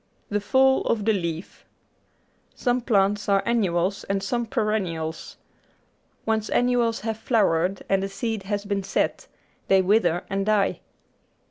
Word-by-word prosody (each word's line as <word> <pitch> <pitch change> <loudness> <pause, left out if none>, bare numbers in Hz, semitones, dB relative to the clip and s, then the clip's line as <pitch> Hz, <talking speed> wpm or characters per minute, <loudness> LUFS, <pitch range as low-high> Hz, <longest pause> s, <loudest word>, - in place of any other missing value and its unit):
The 205 0 -1
Fall 265 +5 +3
of 215 -3 0
the 220 - +3
Leaf 170 -2 -4 0.9
Some 245 -1 0
plants 205 -3 +1
are 195 0 +3
annuals 195 -4 0
and 195 0 -1
some 235 +3 -1
perennials. 195 -9 -2 0.9
Once 220 -1 0
annuals 245 -2 +1
have 220 -1 -3
flowered 190 -6 +1
and 195 -1 +2
the 195 - -3
seed 225 +1 -3
has 205 +1 -3
been 200 -1 -1
set, 195 +1 -1 0.4
they 190 -1 +4
wither 180 -3 +2
and 195 0 -1
die. 210 -2 +2
205 Hz, 135 wpm, -24 LUFS, 195-225 Hz, 0.9 s, they